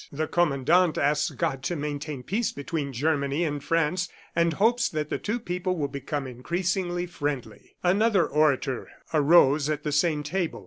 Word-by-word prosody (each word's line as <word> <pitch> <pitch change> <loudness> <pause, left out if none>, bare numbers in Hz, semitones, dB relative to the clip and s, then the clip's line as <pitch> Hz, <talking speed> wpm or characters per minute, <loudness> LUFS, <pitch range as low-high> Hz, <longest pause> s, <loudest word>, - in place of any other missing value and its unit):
"The 155 +2 -2
Commandant 170 +1 +2
asks 145 +1 +2
God 155 -6 -2
to 175 - -1
maintain 145 -2 -4
peace 215 - -1
between 145 0 -4
Germany 140 +3 0
and 145 -3 -2
France 165 +2 0 0.3
and 170 -1 +2
hopes 230 +7 +2
that 150 -1 -3
the - - -2
two 225 +3 -2
peoples 180 -3 -2
will 145 -3 -1
become 140 +1 -4
increasingly 175 +7 -2
friendly." 145 -9 -5
Another 195 0 +3
orator 140 -4 +1 0.2
arose 150 -1 +5
at 155 - -2
the 150 - -2
same 150 0 +1
table. 170 +3 -2
155 Hz, 155 wpm, -26 LUFS, 145-175 Hz, 0.3 s, arose